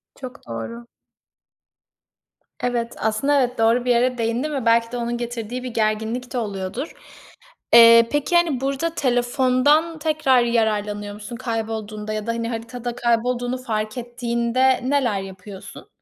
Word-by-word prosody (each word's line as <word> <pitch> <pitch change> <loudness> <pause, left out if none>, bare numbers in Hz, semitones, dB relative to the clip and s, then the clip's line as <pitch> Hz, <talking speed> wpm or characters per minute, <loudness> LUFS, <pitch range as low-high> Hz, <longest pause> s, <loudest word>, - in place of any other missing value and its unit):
Çok 255 -2 -10
doğru. 230 - -6 1.7
Evet, 240 -1 -2
aslında 250 +7 +1
evet, 250 0 -1
doğru 230 +2 +2
bir 250 - +2
yere 245 +1 +2
değindin 235 +6 -1
ve 270 -4 -3
belki 230 0 +3
de 245 - -4
onun 235 0 -2
getirdiği 240 +1 -5
bir 255 - -4
gerginlik 220 +3 -1
de 250 - -2
oluyordur. 205 - -4 0.8
Eee, 230 0 +9
peki, 295 +4 0
hani, 325 -7 +2
burada 275 +4 -1
telefondan 260 +5 +2
tekrar 300 -5 +2
yararlanıyor 210 -3 -1
musun, 210 +3 -8
kaybolduğunda 220 -3 -4
ya 215 0 -4
da, 230 - +1
hani, 230 0 -3
haritada 235 +1 -5
kaybolduğunu 245 +1 0
fark 215 -3 -3
ettiğinde 240 +1 0
neler 250 -8 +1
yapıyorsun? 190 0 -10
235 Hz, 135 wpm, -22 LUFS, 225-255 Hz, 1.7 s, Eee